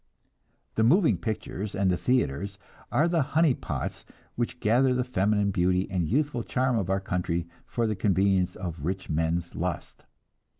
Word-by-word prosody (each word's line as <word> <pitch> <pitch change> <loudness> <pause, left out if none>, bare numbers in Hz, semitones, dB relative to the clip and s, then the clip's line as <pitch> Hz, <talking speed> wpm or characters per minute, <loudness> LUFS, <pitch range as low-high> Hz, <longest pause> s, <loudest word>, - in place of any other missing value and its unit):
The 110 - +1
moving 165 - +4
pictures 105 -3 -4
and 95 -1 +2
the - - +2
theatres 100 - 0 0.3
are 155 - +3
the 170 -2 +2 0.2
honey 160 -4 +5
pots - - -4 0.3
which 120 +1 -2
gather 125 +4 +3
the 125 - +1
feminine 105 -4 +1
beauty 90 +1 +1
and 90 -4 0
youthful 140 -1 +1
charm 125 +2 0
of 100 -5 -1
our 95 0 +2
country 90 -2 -2 0.2
for 120 - -1
the 110 -1 0
convenience 95 -1 +2
of 85 -5 -6
rich 95 +1 -3
men's 80 +2 -1
lust. - - -4
100 Hz, 160 wpm, -27 LUFS, 90-125 Hz, 0.3 s, honey